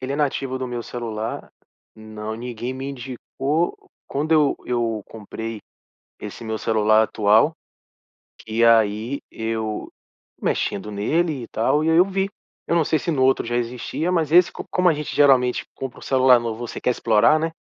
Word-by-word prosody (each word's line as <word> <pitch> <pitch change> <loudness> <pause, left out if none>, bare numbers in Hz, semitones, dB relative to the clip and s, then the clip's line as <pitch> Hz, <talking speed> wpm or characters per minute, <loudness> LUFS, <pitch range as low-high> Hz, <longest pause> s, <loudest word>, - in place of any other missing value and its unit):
Ele 130 +1 -4
é - - -2
nativo 135 -3 -1
do 130 - -3
meu 120 -1 -4
celular. 115 -2 -5 0.4
Não, 110 0 -7
ninguém 120 +1 -5
me 135 +1 -6
indicou. 135 +5 -2 0.3
Quando 150 +3 -1
eu 150 -3 +4
eu 115 -3 -1
comprei 110 0 -7 0.6
esse 105 +2 -8
meu 110 0 -3
celular 110 0 +3
atual, 110 +8 +3 0.9
que 110 +1 -1
aí 115 +3 +3
eu 110 -1 -4 0.5
mexendo 105 +2 -1
nele 145 +6 0
e - - -9
tal 145 +7 +1
e 160 - +1
aí 165 - +4
eu 180 - +7
vi. 195 0 -1 0.4
Eu - - +1
não 165 - +4
sei 155 - +1
se 175 - -4
no 130 -3 +1
outro 135 0 +3
já 120 +1 -2
existia, 120 +8 -2
mas 160 -4 0
esse 175 0 +6
Co - - -8
como 180 0 +3
a 165 - +3
gente 150 0 -5
geralmente 130 -3 +4
compra 135 -2 -6
o - - -17
celular 130 -2 +5
novo, 115 0 -4
você - - -7
quer - - +1
explorar, 115 +6 +3
né 165 +1 -1
125 Hz, 175 wpm, -22 LUFS, 110-145 Hz, 0.9 s, eu